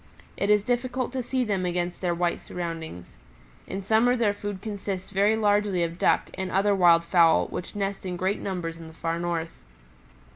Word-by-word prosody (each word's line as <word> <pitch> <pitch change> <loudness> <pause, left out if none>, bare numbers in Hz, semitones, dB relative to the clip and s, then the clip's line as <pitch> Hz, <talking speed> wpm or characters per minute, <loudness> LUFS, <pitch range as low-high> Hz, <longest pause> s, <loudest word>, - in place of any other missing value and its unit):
It 200 - -1
is 210 -1 +4
difficult 250 +1 -1
to 260 0 -2
see 255 +1 -1
them 200 -5 -1
against 175 0 -2
their 175 -2 0
white 175 0 0
surroundings. 165 - -6 0.5
In 195 +1 -5
summer 225 +5 +3
their 225 -4 +2
food 205 -1 -5
consists 200 -2 -5
very 200 +2 +3
largely 205 -4 +2
of 170 +1 -4
ducks - - +2
and 190 0 -4
other 200 +2 +2
wild 170 -3 +5
fowl 170 -1 +4
which 180 - -6
nest 200 -1 -2
in 180 -2 -4
great 190 +3 0
numbers 170 -4 -4
in 165 - -9
the 160 - -13
Far 165 0 -2
North. 170 -1 -2
190 Hz, 185 wpm, -26 LUFS, 170-205 Hz, 0.5 s, wild